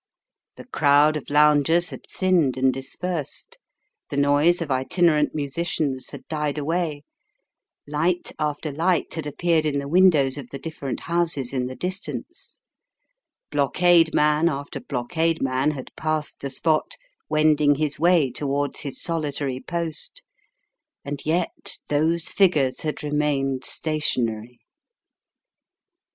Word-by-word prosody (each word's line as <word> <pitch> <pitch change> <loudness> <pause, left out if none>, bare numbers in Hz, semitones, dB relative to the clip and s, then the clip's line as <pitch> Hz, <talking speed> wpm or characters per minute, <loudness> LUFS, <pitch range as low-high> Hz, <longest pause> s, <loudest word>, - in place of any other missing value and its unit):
The - - -11
crowd 150 - +4
of 150 - -5
loungers 150 +3 +4
had - - -10
thinned 175 -9 +1
and 130 0 +3
dispersed; 175 - -5 0.5
the 140 - -4
noise 145 +5 +3
of 165 -4 -4
itinerant 150 +4 +2
musicians 145 -2 -2
had - - -11
died 150 -2 -2
away; 155 -1 -2 0.8
light 165 +5 -1
after 150 0 -2
light 165 +4 0
had 160 -2 -4
appeared 165 +2 +1
in 150 -2 0
the 140 0 -3
windows 150 -5 +4
of 130 -3 -9
the 140 - -6
different 140 -3 -5
houses 165 -7 -1
in 125 -2 -1
the 130 - -7
distance; 185 +6 -6 0.9
blockade 165 +4 +4
man 150 +2 +3
after 140 -2 -5
blockade 160 +6 -1
man 130 +2 +1
had 140 -4 -6
passed 155 -1 -2
the 140 - -4
spot, 155 +3 0 0.3
wending 150 -1 +3
his 150 0 -2
way 165 -5 +3
towards 140 +2 -2
his 140 -3 -6
solitary 145 -5 -2
post; 170 - -3 0.8
and 140 0 -4
yet 170 +2 -1
those 160 +3 +1
figures 155 -10 +2
had 155 -1 -4
remained 145 -3 0
stationary. 125 -7 -1
150 Hz, 125 wpm, -23 LUFS, 140-165 Hz, 0.9 s, crowd